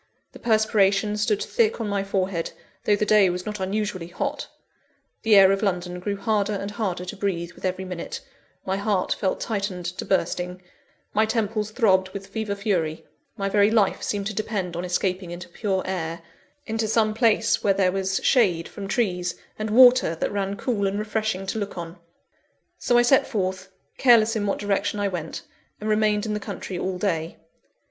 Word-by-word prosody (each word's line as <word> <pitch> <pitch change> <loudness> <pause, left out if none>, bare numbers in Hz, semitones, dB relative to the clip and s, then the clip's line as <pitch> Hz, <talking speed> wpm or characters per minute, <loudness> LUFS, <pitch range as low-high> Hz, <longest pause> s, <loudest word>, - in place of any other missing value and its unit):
The - - -13
perspiration 210 -2 +2
stood 210 0 0
thick 460 - +1
on 225 - -2
my 200 -1 -1
forehead, 190 -3 -2 0.3
though 210 - +4
the 210 - 0
day 210 -3 +5
was 180 +1 -3
not 210 -1 -4
unusually 190 -2 -2
hot; 175 - -3 0.7
the 220 -1 +4
air 195 -1 +8
of 195 - 0
London 180 -3 -1
grew 200 +2 -3
harder 210 0 0
and 200 0 -4
harder 190 -4 -3
to - - -6
breathe, 175 -4 -2
with - - -9
every 185 0 -2
minute; 180 -2 -5 0.5
my 190 +1 -1
heart 200 -2 0
felt 190 - -1
tightened 195 -5 -3
to 175 +1 -4
bursting; 180 -1 -1 0.5
my 215 +1 +3
temples 215 -1 -1
throbbed 190 -5 +3
with 195 0 -5
fever 200 +1 -3
fury; 175 -6 -1 0.3
my 195 -1 -1
very 205 +1 +4
life 220 -3 +2
seemed 200 -1 -2
to 215 - -2
depend 195 -4 -3
on 175 - -3
escaping 180 0 -1
into 175 0 -7
pure 190 +1 -1
air, 170 -3 -3 0.4
into 220 -1 -1
some 215 0 +2
place 225 -1 +2
where 195 -1 +3
there 185 -2 +3
was 190 0 -1
shade 185 -10 +3
from 200 -1 -7
trees, 180 -6 0 0.2
and 215 0 -2
water 245 -5 +6
that - - -2
ran 200 -1 -2
cool 205 -5 0
and 195 +1 -2
refreshing 215 -2 -2
to 205 +3 -3
look 200 -2 -5
on. 170 +1 -7 0.8
So 240 - +2
I 240 - +6
set 260 +2 +4
forth, 190 -4 -2 0.3
careless 230 -3 +5
in 205 -2 -1
what 195 - 0
direction 205 0 -1
I 200 -1 +1
went; 170 -4 -5 0.4
and 215 - -5
remained 215 0 +2
in 215 - -2
the 210 - -1
country 190 -2 -6
all 185 0 -2
day. 170 -4 -2
200 Hz, 185 wpm, -24 LUFS, 185-215 Hz, 0.8 s, air